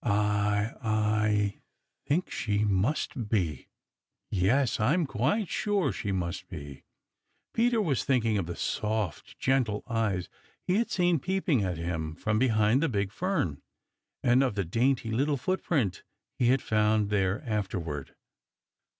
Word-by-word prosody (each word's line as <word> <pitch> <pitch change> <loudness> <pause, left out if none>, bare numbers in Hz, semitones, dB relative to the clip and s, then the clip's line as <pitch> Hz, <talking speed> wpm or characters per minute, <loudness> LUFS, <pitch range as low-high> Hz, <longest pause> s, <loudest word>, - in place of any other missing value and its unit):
I 105 0 +1
I 110 -2 +1 0.5
think 170 +6 0
she 105 -2 0
must 105 +3 0
be. 85 - -1 0.6
Yes, 115 +8 +2
I 115 +9 +3
am 175 -3 +1
quite 145 - 0
sure 205 0 0
she 100 - -3
must 90 -2 -3
be." 70 -6 -9 0.7
Peter 235 0 +2
was 155 - +1
thinking 115 -6 +2
of 85 - -3
the 85 - -4
soft, 105 -5 -2
gentle 125 -6 +1
eyes 105 -6 0 0.4
he 185 - +1
had 230 +1 +1
seen 175 -5 +2
peeping 180 - +1
at 90 -3 -2
him 80 -2 -3
from 110 +4 0
behind 115 0 +3
the 165 - +2
big 100 -4 -1
fern, 170 - -1 0.6
and 125 +2 +4
of 130 -6 +1
the 100 -2 -1
dainty 115 +5 +1
little 140 +5 +1
footprint 135 - -1 0.4
he 120 - +3
had 130 +1 +3
found 105 -1 +2
there 100 +4 +1
afterward. 95 - -3
110 Hz, 140 wpm, -29 LUFS, 100-135 Hz, 0.7 s, and